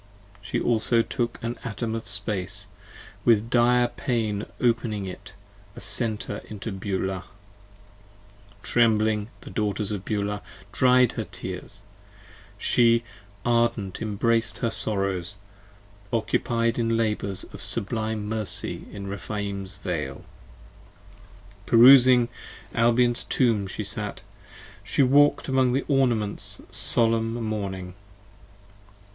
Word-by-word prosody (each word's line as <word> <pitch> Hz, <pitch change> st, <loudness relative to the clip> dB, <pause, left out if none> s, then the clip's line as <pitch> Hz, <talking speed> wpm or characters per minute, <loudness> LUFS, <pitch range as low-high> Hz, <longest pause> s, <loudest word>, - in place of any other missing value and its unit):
She 100 Hz, -, -2 dB
also 115 Hz, 0 st, +2 dB
took 120 Hz, -1 st, -2 dB
an 115 Hz, +1 st, -3 dB
Atom 115 Hz, -2 st, -3 dB
of 115 Hz, -1 st, -5 dB
Space, 100 Hz, -1 st, -3 dB, 0.6 s
with 115 Hz, 0 st, +3 dB
dire 120 Hz, 0 st, +4 dB
pain 110 Hz, -5 st, -2 dB
opening 115 Hz, -4 st, 0 dB
it 95 Hz, -, -9 dB, 0.4 s
a -, -, -8 dB
Center 110 Hz, -2 st, -1 dB
Into 105 Hz, +1 st, -6 dB
Beulah: 95 Hz, -1 st, -3 dB, 1.4 s
trembling 110 Hz, -3 st, +2 dB
the -, -, -10 dB
Daughters 105 Hz, -1 st, -1 dB
of 100 Hz, -3 st, -4 dB
Beulah 105 Hz, -1 st, -2 dB, 0.3 s
dried 125 Hz, -1 st, +4 dB
40 -, -, -16 dB
Her -, -, -8 dB
tears, -, -, -7 dB, 0.8 s
she 115 Hz, -1 st, +3 dB, 0.4 s
ardent 115 Hz, -5 st, +1 dB
embrac'd 115 Hz, +2 st, 0 dB
her 115 Hz, -3 st, -1 dB
sorrows, 95 Hz, -4 st, -1 dB, 0.8 s
occupied 115 Hz, 0 st, 0 dB
in 115 Hz, -1 st, +1 dB
labours 105 Hz, -4 st, -1 dB
Of -, -, -9 dB
sublime 110 Hz, 0 st, -1 dB
mercy 110 Hz, -1 st, -4 dB
in 100 Hz, -1 st, -7 dB
Rephaim's 100 Hz, -1 st, -4 dB
Vale. 75 Hz, -7 st, -4 dB, 1.4 s
Perusing 125 Hz, 0 st, +8 dB, 0.5 s
Albion's 120 Hz, +1 st, +3 dB
Tomb 115 Hz, -6 st, +1 dB
She -, -, -5 dB
sat: -, -, -5 dB, 0.6 s
she 140 Hz, -, +2 dB
walk'd 145 Hz, +3 st, +4 dB
among 130 Hz, -2 st, +2 dB
the 135 Hz, -, 0 dB
ornaments 120 Hz, -7 st, 0 dB
solemn 115 Hz, 0 st, +1 dB
mourning. 100 Hz, -5 st, -4 dB
110 Hz, 105 wpm, -25 LUFS, 100-120 Hz, 1.4 s, Perusing